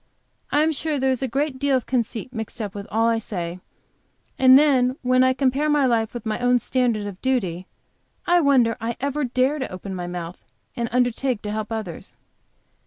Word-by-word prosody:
I 295 +1 +3
am 320 - +2
sure 310 0 -1
there 265 0 +1
is 260 - -1
a 265 - 0
great 270 +2 -2
deal 280 -1 +2
of 255 - -5
conceit 245 -1 -2
mixed 225 0 -6
up 205 -3 -4
with 200 -1 -7
all 225 +2 +2
I 230 -1 +2
say, 180 -5 -5 0.8
and 260 0 +8
then 260 -4 +3
when 255 0 +4
I 260 - +4
compare 275 +3 +1
my 295 -2 +3
life 230 -3 +1
with 240 -2 -7
my 215 -1 -2
own 245 0 +3
standard 240 -3 0
of 200 -2 -8
duty, 190 -9 -1 0.6
I 350 0 +4
wonder 260 -6 +3
I 230 +1 -3
ever 285 +2 -1
dare 260 +4 +1
to 260 - -4
open 185 +1 -7
my 180 -1 -4
mouth 175 0 -7 0.3
and 235 -2 -2
undertake 245 -1 0
to 210 - -4
help 215 +1 -4
others. 215 -7 -6
245 Hz, 200 wpm, -23 LUFS, 215-265 Hz, 0.8 s, and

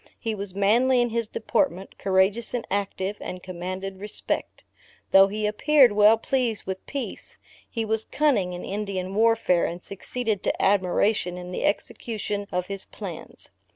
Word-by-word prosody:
He 225 - -2
was 200 -2 -6
manly 235 +6 +4
in 240 0 +2
his 230 -1 -1
deportment, 215 -3 -1
courageous 195 +5 +2
and, 240 - -3
active; 200 0 -2
and 180 0 -6
commanded 185 +1 -5
respect. 210 +1 -4 0.5
Though 195 0 +8
he 210 +2 -2
appeared 260 +4 +5
well 210 +2 +6
pleased 235 -2 -1
with 190 0 -5
peace, 275 -3 -6 0.3
he 225 -2 -2
was 220 0 -1
cunning 250 -12 +1
in 180 - -6
Indian 195 -2 -3
warfare, 220 -5 +3
and 170 +1 -5
succeeded 215 +1 -3
to - - -1
admiration 185 -1 +2
in 180 0 -7
the - - -2
execution 205 -1 -2
of 180 0 -1
his 195 0 -5
plans. - - -9
205 Hz, 155 wpm, -25 LUFS, 190-225 Hz, 0.5 s, Though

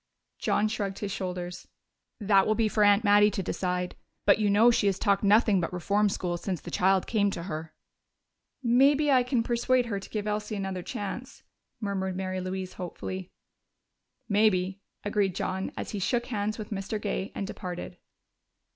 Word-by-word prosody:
John 210 - +2
shrugged 205 -3 -3
his 205 -1 -4
shoulders. 180 -2 -5 0.5
"That 195 -2 +4
will 215 - +2
be 225 0 +2
for 210 0 +2
Aunt 205 +1 +5
Mattie 205 0 +6
to 195 -2 -3
decide. 180 0 -2 0.3
But - - +5
you 210 -1 +2
know 220 +4 +6
she 215 -3 +2
has 195 -2 +1
talked 200 -1 +2
nothing 205 -1 +4
but 165 - -2
reform 200 +4 +1
school 175 -2 -2
since 180 0 -3
the - - -9
child 190 0 +3
came 205 -3 +2
to 170 -3 -5
her." 160 -2 -6 0.9
"Maybe 275 +5 +4
I 260 -2 +6
can 245 -1 0
persuade 245 +1 +2
her 205 -4 -2
to 195 - -11
give 210 -2 -3
Elsie 210 0 -2
another 190 -2 -3
chance," 205 +8 -6 0.4
murmured 190 -3 -2
Mary 185 0 -3
Louise 185 0 -4
hopefully. 185 +1 -6 1.0
"Maybe," 200 -3 +2 0.2
agreed 205 -3 0
John 190 +1 -2
as - - -4
he 205 - -3
shook 240 +5 0
hands 215 -3 -2
with 215 -1 -7
Mr. 200 +1 -3
Gay 200 -2 -3
and 195 - -2
departed. 180 -2 -6
200 Hz, 175 wpm, -28 LUFS, 185-215 Hz, 1.0 s, Mattie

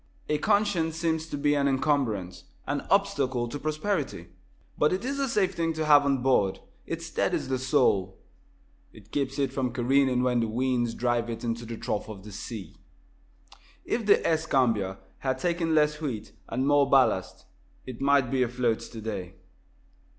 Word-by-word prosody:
A 150 - +1
conscience 200 -4 +1
seems 160 -1 -1
to 145 - -4
be 145 +1 +2
an 140 -1 +2
encumbrance 115 - 0 0.2
an 145 0 -2
obstacle 140 -12 +1
to 145 +5 -6
prosperity. 155 - -2 0.5
But 150 - +2
it 190 +6 -2
is 275 +1 -2
a 275 -1 0
safe 205 -4 +1
thing 165 -1 -1
to 155 0 -2
have 145 -1 +6
on 135 -3 +1
board. 105 -8 +2 0.3
It - - -4
steadies - - -1
the 130 -1 0
soul. 125 -9 +2 0.7
It 105 -1 -17
keeps 135 -2 -2
it 135 -2 0
from 130 -2 -1
careening 130 +1 +2
when 125 -1 +2
the 115 - 0
winds 120 0 0
drive 120 -1 0
it 115 0 -5
into 115 0 -3
the 115 0 -6
trough 105 0 -3
of 100 -3 -9
the 105 - -10
sea. 100 -3 -8 1.1
If 225 -2 -2
the 205 - +4
"Escambia" 125 - +1 0.2
had 130 -1 -1
taken 170 +1 0
less 150 0 +2
wheat 115 -8 -4 0.2
and 130 +4 -1
more 145 -1 +4
ballast, 135 -2 +2 0.4
it 130 -1 -8
might 140 -2 +3
be 130 -1 +1
afloat 125 -2 +1
today. 105 -6 -6
130 Hz, 165 wpm, -27 LUFS, 115-150 Hz, 1.1 s, have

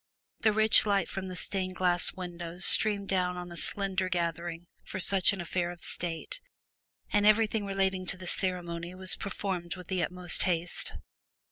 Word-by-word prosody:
The 220 - +3
rich 220 0 +5
light 200 -2 +2
from 190 -1 -5
the 185 - -6
stained 185 0 -3
glass 175 -1 +5
windows 175 0 -5
streamed 205 -2 +4
down 180 -2 0
on 175 0 -7
a - - -8
slender 190 +2 -2
gathering 170 -1 -3 0.2
for 190 - -6
such 190 0 +5
an 200 - -5
affair 175 0 -2
of 175 -1 -9
state, 175 - -3 0.7
and 205 -1 +3
everything 215 0 +3
relating 190 -1 -1
to 195 - +2
the 185 - -9
ceremony 175 -1 -3
was 185 0 +2
performed 190 -3 -4
with 180 -2 -11
the 185 -1 0
utmost 180 0 0
haste. 175 -1 -1
185 Hz, 165 wpm, -29 LUFS, 175-195 Hz, 0.7 s, rich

